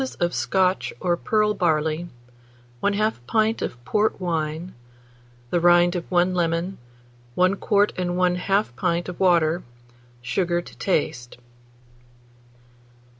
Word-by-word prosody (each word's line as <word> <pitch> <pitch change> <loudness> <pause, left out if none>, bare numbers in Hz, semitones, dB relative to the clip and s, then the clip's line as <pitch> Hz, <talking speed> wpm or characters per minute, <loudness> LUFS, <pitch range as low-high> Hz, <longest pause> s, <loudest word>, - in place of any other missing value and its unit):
of 175 0 0
Scotch 190 -1 +1
or 175 -1 +1
pearl 210 +4 +1
barley, 160 -2 0 0.7
1/2 205 -1 0
pint 220 - +1
of 120 0 -5
port 215 -1 +1
wine, 165 -1 -3 0.8
the 175 - +2
rind 175 +1 +4
of 175 - -4
1 180 0 +2
lemon, 170 +1 -1 0.6
1 185 +1 +3
quart 205 +1 +1
and 180 -1 -1
1/2 180 - +1
pint 170 +6 -1
of 180 - -7
water, 175 -2 +3 0.6
sugar 175 +8 -1
to 175 - -10
taste. 120 -9 -2
175 Hz, 115 wpm, -23 LUFS, 170-195 Hz, 0.8 s, rind